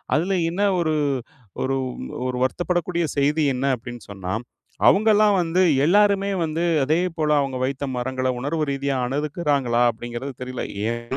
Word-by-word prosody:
அதுல 180 Hz, +4 st, +1 dB
என்ன 195 Hz, +4 st, -1 dB, 0.2 s
ஒரு 155 Hz, -2 st, +1 dB, 0.7 s
ஒரு 135 Hz, +1 st, 0 dB, 0.5 s
ஒரு 125 Hz, 0 st, -2 dB
வருத்தப்படக்கூடிய 175 Hz, +4 st, 0 dB
செய்தி 145 Hz, +3 st, +2 dB
என்ன 130 Hz, +2 st, -2 dB
அப்டின்னு 120 Hz, -1 st, -10 dB
சொன்னா, 95 Hz, -1 st, -5 dB, 0.5 s
அவுங்களாம் 210 Hz, 0 st, +5 dB
வந்து 175 Hz, +2 st, +1 dB, 0.2 s
எல்லாருமே 200 Hz, +2 st, +3 dB
வந்து 160 Hz, 0 st, -1 dB, 0.2 s
அதே 155 Hz, +4 st, +2 dB, 0.2 s
போல 155 Hz, -1 st, +1 dB
அவுங்க 135 Hz, -2 st, -1 dB
வைத்த 135 Hz, +2 st, -2 dB
மரங்கள 130 Hz, +1 st, -2 dB
உணர்வு 150 Hz, +5 st, -1 dB
ரீதியா 140 Hz, 0 st, -1 dB
அணுகுக்கிறாங்களா 140 Hz, -3 st, 0 dB
அப்படிங்கிறது 120 Hz, +4 st, -6 dB
தெரில. 125 Hz, 0 st, -5 dB, 0.3 s
ஏன்னா 120 Hz, 0 st, -4 dB
145 Hz, 135 wpm, -23 LUFS, 130-170 Hz, 0.7 s, அவுங்களாம்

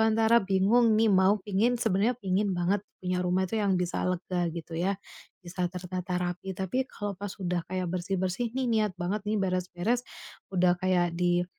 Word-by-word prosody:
antara 225 Hz, +1 st, +4 dB
bingung 210 Hz, +4 st, +3 dB
nih 225 Hz, 0 st, +4 dB
mau 190 Hz, +2 st, +5 dB
pengen, 215 Hz, +5 st, +2 dB
sebenarnya 225 Hz, +1 st, +1 dB
pengen 195 Hz, 0 st, 0 dB
banget 185 Hz, +3 st, +1 dB, 0.2 s
punya 180 Hz, 0 st, 0 dB
rumah 180 Hz, +1 st, +1 dB
tuh 220 Hz, +2 st, -1 dB
yang 195 Hz, -2 st, +2 dB
bisa 180 Hz, -1 st, -1 dB
lega, 180 Hz, -1 st, -1 dB
gitu 165 Hz, -1 st, -7 dB
ya, 190 Hz, +2 st, 0 dB, 0.5 s
bisa 180 Hz, 0 st, -2 dB
tertata 180 Hz, 0 st, -4 dB
rapi, 180 Hz, +2 st, -3 dB
tapi 195 Hz, +8 st, -1 dB
kalau 205 Hz, -1 st, -4 dB
pas 200 Hz, -1 st, -5 dB
udah 180 Hz, -1 st, 0 dB
kayak 185 Hz, 0 st, -2 dB
bersih-bersih 185 Hz, +5 st, -1 dB
nih, 260 Hz, -1 st, 0 dB
niat 215 Hz, -3 st, +2 dB
banget 190 Hz, +4 st, -1 dB
nih 215 Hz, -, +1 dB
beres-beres. 185 Hz, +5 st, 0 dB, 0.5 s
Udah 180 Hz, -1 st, +4 dB
kayak 175 Hz, -2 st, +1 dB
di, 175 Hz, 0 st, +2 dB
190 Hz, 170 wpm, -28 LUFS, 180-210 Hz, 0.5 s, mau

